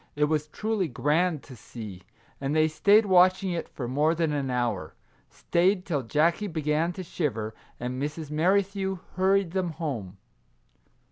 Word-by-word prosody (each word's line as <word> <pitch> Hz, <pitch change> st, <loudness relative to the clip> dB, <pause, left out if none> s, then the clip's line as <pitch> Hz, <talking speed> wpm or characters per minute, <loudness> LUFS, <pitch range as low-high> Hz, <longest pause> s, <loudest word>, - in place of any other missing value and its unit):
It 150 Hz, -, +1 dB
was 150 Hz, 0 st, +1 dB
truly 210 Hz, +3 st, -1 dB
grand 155 Hz, +4 st, +1 dB
to 130 Hz, -, -12 dB
see, 110 Hz, -5 st, -9 dB, 0.4 s
and 140 Hz, +2 st, -2 dB
they 155 Hz, 0 st, +4 dB
stayed 200 Hz, +8 st, +4 dB
watching 185 Hz, 0 st, +4 dB
it 170 Hz, -1 st, -3 dB
for 125 Hz, -, -5 dB
more 150 Hz, +6 st, +2 dB
than 165 Hz, -2 st, 0 dB
an 140 Hz, -2 st, -1 dB
hour; 120 Hz, -10 st, -2 dB, 0.3 s
stayed 180 Hz, +2 st, +1 dB
till 145 Hz, -6 st, -1 dB
Jackie 160 Hz, -, +1 dB
began 155 Hz, 0 st, 0 dB
to 185 Hz, -, -6 dB
shiver, 115 Hz, -11 st, -3 dB, 0.3 s
and 125 Hz, +2 st, -4 dB
Mrs. 150 Hz, +1 st, -4 dB
Merrithew 190 Hz, +4 st, +1 dB, 0.2 s
hurried 190 Hz, -1 st, +2 dB
them 180 Hz, -3 st, -1 dB
home. 125 Hz, -, -5 dB
155 Hz, 150 wpm, -27 LUFS, 135-185 Hz, 0.4 s, they